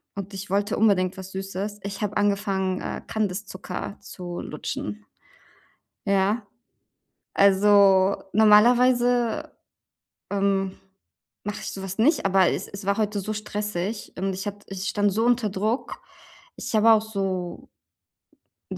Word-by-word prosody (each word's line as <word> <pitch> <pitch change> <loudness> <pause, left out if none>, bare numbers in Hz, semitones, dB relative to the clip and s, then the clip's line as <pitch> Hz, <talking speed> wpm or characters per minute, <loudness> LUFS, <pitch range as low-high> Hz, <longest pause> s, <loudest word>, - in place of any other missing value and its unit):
und 200 0 -6
ich 195 0 -7
wollte 205 +3 0
unbedingt 190 -3 +2
was 190 0 -8
Süßes. 195 +2 -5
Ich 200 +1 -5
habe 210 -1 -1
angefangen, 195 -2 0
äh, - - -4
Kandiszucker 200 -1 -4
zu 175 -3 -7
lutschen. 105 0 -5 1.0
Ja. 200 +3 +1 0.9
Also 200 -1 +5 0.2
normalerweise, 245 +6 +4 0.8
ähm, 195 -1 0 0.7
mache 205 +1 -4
ich - - -4
sowas 195 0 -6
nicht, 275 +1 +3
aber 190 -2 +4
es 195 - -3
es 200 0 -9
war 200 +2 +1
heute 210 -1 0
so 215 +3 -4
stressig. 210 -1 -4
Und 190 +1 -1
ich 195 +3 -6
hat 205 0 -6
ich 195 -1 -5
stand 205 -1 +1
so 220 +4 +1
unter 240 -2 +2
Druck. 215 +6 -2 0.6
Ich - - -6
habe 220 +1 +6
auch 215 -1 +4
so 195 -5 -4 1.0
q - - -5
200 Hz, 130 wpm, -25 LUFS, 190-215 Hz, 1.0 s, habe